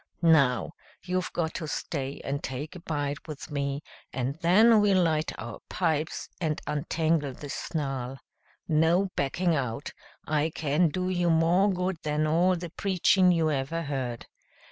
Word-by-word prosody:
Now, 145 -5 +4 0.3
you've 185 0 -2
got 160 -2 -2
to 155 - -4
stay 140 0 -4
and 140 +1 -2
take 145 +7 -5
a - - -7
bite 145 -2 -3
with 150 -2 -8
me, 140 0 -2 0.3
and 130 +1 -2
then 215 +6 +6
we'll 200 -2 +4
light 155 -1 +1
our 110 +1 -7
pipes 160 -3 -1
and 155 -3 0
untangle 150 -1 0
this 145 +1 -7
snarl. 135 -4 -3 0.5
No 165 +5 +3
backing 170 +6 +1
out! 130 -3 -2 0.3
I 155 +1 +1
can 155 +2 +1
do 180 +4 -2
you 175 -1 +1
more 170 +5 +4
good 180 -1 -1
than 150 0 0
all 175 +4 +3
the 170 -1 -6
preachin' 185 0 +3
you 165 -3 +2
ever 145 +4 -2
heard. 130 -5 -3
155 Hz, 150 wpm, -28 LUFS, 140-175 Hz, 0.5 s, then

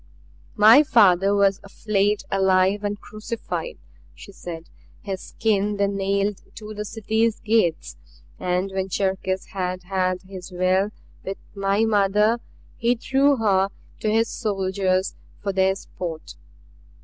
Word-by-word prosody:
"My 220 +7 +8
father 200 - +4
was 200 -1 +3
flayed 205 0 0
alive 190 +1 +2
and 205 0 -2
crucified," 230 - -6 0.4
she 200 - -12
said. 170 -3 -8 0.4
"His 195 -2 -4
skin 210 -2 0
they 200 - +2
nailed 200 0 -1
to 215 0 -8
the 210 0 -5
City's 220 +1 0
gates. 215 -7 0 0.4
And 180 +2 -1
when 190 0 -2
Cherkis 190 0 -1
had 185 -1 -3
had 185 0 -1
his 185 -1 -10
will 185 +2 +1 0.3
with 195 +1 -5 0.2
my 200 +2 +1
mother 210 +2 +3 0.4
he 235 +2 +2
threw 275 +4 +2
her 195 -5 +2 0.3
to 215 - -1
his 225 +1 +2
soldiers 190 -3 -1 0.3
for 200 -1 -3
their 190 0 +2
sport. 170 -4 -7
195 Hz, 125 wpm, -23 LUFS, 190-215 Hz, 0.4 s, My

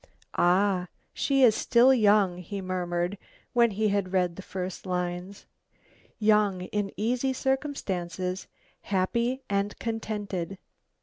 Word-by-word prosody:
"Ah! 185 +1 +2 0.3
she 275 -1 +2
is 235 -3 +7
still 245 +4 +5
young," 205 -6 +4
he 195 +3 -6
murmured, 180 0 -2 0.3
when 235 -1 +5
he 215 +1 0
had 200 -2 0
read 180 -2 +1
the 195 - -7
first 185 0 -6
lines. 180 +2 -3 0.7
"Young, 210 -3 +3
in 195 +2 -2
easy 250 +5 0
circumstances, 190 -10 -2 0.4
happy 235 +7 0
and 200 +1 -1
contented." 205 -5 -4
200 Hz, 115 wpm, -27 LUFS, 185-225 Hz, 0.7 s, is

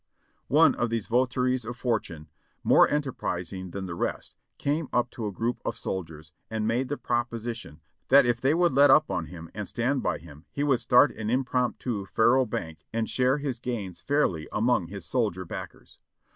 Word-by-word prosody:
One - - +5
of 120 - -1
these 115 -2 -2
votaries 125 +1 +1
of 120 +2 -6
fortune, 105 -11 -2 0.4
more - - +6
enterprising 95 - -3
than 95 +2 -5
the 85 - -5
rest, 85 - -3 0.2
came 145 +1 -1
up 120 0 +1
to 110 -3 -4
a - - -3
group 115 +5 -2
of - - -3
soldiers 80 -4 -6 0.2
and 110 -1 -2
made 120 +4 0
the 145 - -2
proposition 115 - -3 0.3
that 140 0 +7
if 120 0 0
they 135 +4 +3
would 175 -3 +3
let 140 +2 +6
up 155 +3 +5
on 80 -3 -2
him 85 0 -10
and 105 -3 -5
stand 130 +4 0
by - - 0
him 75 -1 -14
he 140 - -2
would 135 -4 +3
start 125 +4 +5
an 110 0 -5
impromptu 125 -4 -1
faro 120 +6 +3
bank 80 -6 -6
and 115 0 -2
share 130 +2 +2
his 140 -4 -3
gains 105 -8 -5
fairly 95 - 0
among 110 -5 +1
his 100 0 -8
sol 120 -4 +1
dier 95 0 -8
backers. - - -9
115 Hz, 185 wpm, -27 LUFS, 95-130 Hz, 0.4 s, that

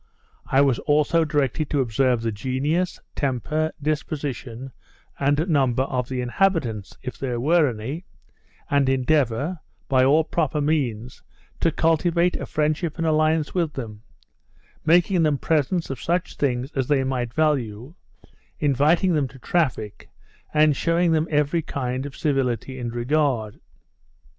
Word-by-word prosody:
I 135 - +3
was 135 -4 +3
also 150 +3 +2
directed 150 -1 0
to 145 - 0
observe 125 -1 +1
the 115 - 0
genius, 140 - -1
temper, 150 +4 -1
disposition, 140 -4 -4 0.5
and 145 +4 +1
number 130 -6 +2
of 125 -2 -3
the 130 -1 -2
inhabitants, 120 - 0
if 125 - -6
there 125 -3 -2
were 155 +3 +3
any, 125 +10 -6 0.6
and 140 -2 +2
endeavour, 135 +3 +1 0.3
by 130 -2 +3
all 150 +5 +4
proper 155 -2 -1
means, 130 -6 -1 0.4
to 165 - +2
cultivate 170 +2 +2
a - - -6
friendship 155 +2 -1
and 165 - -1
alliance 155 0 +2
with 170 -5 0
them; 110 -5 -7 0.8
making 175 +3 +4
them 150 -3 +2
presents 160 +2 0
of 130 - -6
such 175 +1 -1
things 130 0 -1
as 135 -2 -2
they 140 -2 +2
might 125 -3 -2
value; 130 -4 -1 0.7
inviting 150 +5 +3
them 150 -4 +1
to 135 - -14
traffic, 125 -8 -2 0.4
and 150 -1 +4
shewing 170 +3 +2
them 160 0 +2
every 150 +2 +1
kind 130 -2 -3
of 140 - -11
civility 130 -3 -1
and 120 -1 -4
regard. 120 -4 0
145 Hz, 140 wpm, -23 LUFS, 125-155 Hz, 0.8 s, all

